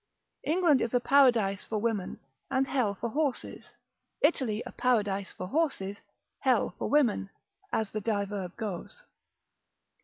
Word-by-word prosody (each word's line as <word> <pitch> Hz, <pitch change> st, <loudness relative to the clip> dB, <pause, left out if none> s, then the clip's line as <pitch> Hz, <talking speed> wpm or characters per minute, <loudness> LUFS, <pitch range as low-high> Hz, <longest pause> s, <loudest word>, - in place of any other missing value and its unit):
England 320 Hz, -4 st, +3 dB
is 235 Hz, +1 st, -1 dB
a -, -, +5 dB
paradise 240 Hz, -8 st, +4 dB
for 220 Hz, -, -3 dB
women, 210 Hz, -3 st, -2 dB, 0.3 s
and 265 Hz, +1 st, +2 dB
hell 250 Hz, -7 st, 0 dB
for 235 Hz, -, -3 dB
horses: 290 Hz, -1 st, -3 dB, 0.5 s
Italy 255 Hz, -8 st, +2 dB
a -, -, -7 dB
paradise 205 Hz, -6 st, 0 dB
for 185 Hz, -, -6 dB
horses, 205 Hz, -, -1 dB, 0.4 s
hell -, -, +2 dB
for -, -, -2 dB
women, 250 Hz, -9 st, +2 dB, 0.4 s
as 220 Hz, -3 st, -1 dB
the 215 Hz, -, -3 dB
diverb 200 Hz, -3 st, -2 dB
goes. 215 Hz, -, -6 dB
225 Hz, 130 wpm, -29 LUFS, 200-270 Hz, 0.5 s, a